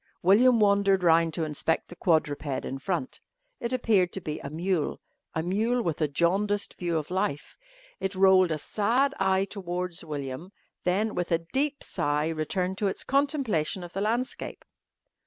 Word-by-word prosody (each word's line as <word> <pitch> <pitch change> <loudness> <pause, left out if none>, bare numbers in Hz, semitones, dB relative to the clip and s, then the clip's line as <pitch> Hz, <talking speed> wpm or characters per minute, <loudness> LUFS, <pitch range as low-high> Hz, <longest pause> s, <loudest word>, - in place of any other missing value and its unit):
William 230 +6 +5
wandered 200 -2 +3
round 165 -1 +4
to 165 - -1
inspect 155 +1 -1
the 175 - -10
quadruped 145 -6 0
in 135 - -4
front. 190 - -3 0.4
It 235 - -3
appeared 215 -8 +2
to - - -3
be 155 -4 -5
a - - -6
mule 170 +1 -1 0.4
a 160 - 0
mule 225 +7 0
with 165 -1 -2
a 155 - +3
jaundiced 195 +7 0
view 170 -2 0
of 155 +2 -4
life. 150 -6 -2 0.4
It 190 0 -3
rolled 185 -2 +5
a 155 - 0
sad 240 - +1
eye 190 0 +2
towards 180 -3 -5
William, 150 +3 -6 0.3
then 205 +5 +1
with 175 -1 -3
a 165 0 +1
deep 285 +1 0
sigh 150 +2 0
returned 180 +4 -2
to 205 - +1
its 190 - -2
contemplation 270 - 0
of 175 - -9
the 195 - -2
landscape. 235 +5 -2
185 Hz, 165 wpm, -27 LUFS, 160-205 Hz, 0.4 s, William